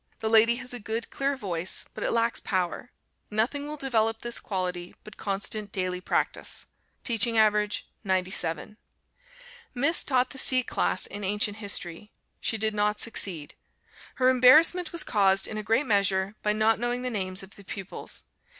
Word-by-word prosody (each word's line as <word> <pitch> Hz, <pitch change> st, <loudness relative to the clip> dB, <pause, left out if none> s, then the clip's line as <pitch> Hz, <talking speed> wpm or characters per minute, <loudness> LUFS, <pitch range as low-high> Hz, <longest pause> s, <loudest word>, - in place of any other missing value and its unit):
The 220 Hz, -, -2 dB
lady 225 Hz, +1 st, +6 dB
has 250 Hz, 0 st, -6 dB
a 245 Hz, -, -4 dB
good 225 Hz, +2 st, -5 dB
clear 275 Hz, 0 st, -1 dB
voice, 185 Hz, -6 st, -1 dB
but -, -, -6 dB
it -, -, 0 dB
lacks 230 Hz, 0 st, +1 dB
power; 185 Hz, +5 st, -3 dB, 0.4 s
nothing 250 Hz, +7 st, -1 dB
will 300 Hz, 0 st, -5 dB
develop 225 Hz, -5 st, 0 dB
this 240 Hz, -1 st, -1 dB
quality 180 Hz, -3 st, -4 dB
but 215 Hz, -, -12 dB
constant 205 Hz, +1 st, -3 dB
daily 185 Hz, -2 st, -2 dB
practice. -, -, -1 dB, 0.4 s
Teaching 230 Hz, -1 st, +2 dB
average 210 Hz, -1 st, +2 dB, 0.2 s
97. 185 Hz, 0 st, -1 dB, 1.0 s
Miss 285 Hz, +7 st, +3 dB
taught 255 Hz, -2 st, +1 dB
the 265 Hz, -, -1 dB
C 255 Hz, -1 st, +4 dB
class 90 Hz, -, -1 dB
in 205 Hz, 0 st, -5 dB
Ancient 205 Hz, +2 st, 0 dB
History. 200 Hz, -2 st, -2 dB, 0.3 s
She 225 Hz, -, -1 dB
did 215 Hz, 0 st, -1 dB
not 210 Hz, 0 st, 0 dB
succeed. 180 Hz, -9 st, +1 dB, 0.6 s
Her 255 Hz, -1 st, +3 dB
embarrassment 305 Hz, +8 st, +5 dB
was 340 Hz, -, 0 dB
caused 195 Hz, -3 st, +2 dB
in 215 Hz, -, -5 dB
a -, -, -2 dB
great 225 Hz, +7 st, +1 dB
measure 195 Hz, -3 st, +1 dB
by 210 Hz, -, +1 dB
not 215 Hz, +1 st, +2 dB
knowing 240 Hz, +1 st, -2 dB
the 250 Hz, -, -2 dB
names 185 Hz, -3 st, -3 dB
of 190 Hz, -, -13 dB
the 200 Hz, -, -14 dB
pupils. 195 Hz, 0 st, -7 dB
215 Hz, 165 wpm, -27 LUFS, 195-240 Hz, 1.0 s, lady